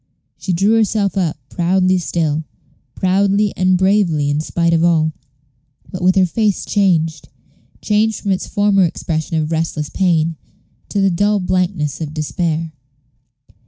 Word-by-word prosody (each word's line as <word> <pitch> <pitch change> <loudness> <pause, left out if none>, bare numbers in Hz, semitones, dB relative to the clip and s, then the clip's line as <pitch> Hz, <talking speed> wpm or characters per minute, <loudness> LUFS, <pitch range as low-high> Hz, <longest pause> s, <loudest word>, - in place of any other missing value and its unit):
She 190 - -3
drew 195 +5 +2
herself 210 -2 +1
up, 175 -6 -1
proudly 185 +3 +1
still 160 -3 -1 0.5
proudly 200 +2 +1
and 185 0 +2
bravely 180 -7 +2
in 145 - 0
spite 170 +2 0
of 165 0 +2
all, 160 -2 +2 0.8
but 185 - -6
with 185 +1 +3
her 190 -1 +4
face 205 +2 0
changed 165 -6 0 0.5
changed 215 0 +1
from 200 - -2
its 185 - -1
former 205 -1 +2
expression 160 -1 -2
of 155 0 -1
restless 160 -2 -2
pain 165 -3 +1 0.5
to 200 - -1
the 195 -1 +3
dull 205 +4 +1
blankness 180 -5 -1
of 155 -1 -5
despair. 160 +1 -2
180 Hz, 140 wpm, -17 LUFS, 160-195 Hz, 0.8 s, her